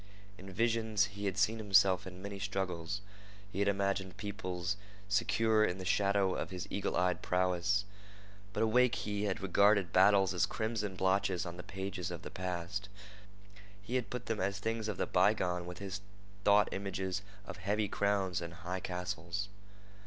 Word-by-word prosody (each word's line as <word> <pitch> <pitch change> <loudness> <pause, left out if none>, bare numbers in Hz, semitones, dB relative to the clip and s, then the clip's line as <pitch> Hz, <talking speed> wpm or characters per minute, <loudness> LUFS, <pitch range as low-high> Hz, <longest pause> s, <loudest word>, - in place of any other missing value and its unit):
In 95 +1 -9
visions 110 0 +2
he 100 0 -5
had 100 -1 -1
seen 110 +3 +2
himself 95 -3 +4
in 90 +1 -9
many 100 -1 -5
struggles. 95 -2 -2 0.5
He 95 - -4
had 100 - +2
imagined 100 -1 0
peoples 100 -3 -3 0.3
secure 110 +2 +3
in 90 -3 +1
the 95 - -6
shadow 100 0 +2
of - - -3
his 90 -2 -5
eagle 100 - -1
eyed 90 0 +1
prowess. 90 +2 +1 0.7
But 105 - 0
awake 125 +2 +4
he 105 0 -2
had 100 -1 -1
regarded 100 -1 +4
battles 95 0 +5
as 90 - +2
crimson 110 -3 -2
blotches 95 -1 +1
on 85 0 -6
the - - -5
pages 95 -2 -4
of 85 -2 -6
the - - -7
past. 90 +2 -4 0.9
He 105 +4 -8
had 125 -5 0
put 125 -1 -5
them 115 - -2
as 100 +1 0
things 110 +2 -2
of 105 -4 -3
the - - +1
bygone 90 -2 +2
with 90 - -7
his 100 0 -5 0.4
thought 100 0 +6
images 95 -1 -2 0.2
of - - -7
heavy 100 +3 0
crowns 100 -3 0
and 85 0 -6
high 90 +2 -4
castles. 90 +2 -3
100 Hz, 165 wpm, -33 LUFS, 90-105 Hz, 0.9 s, thought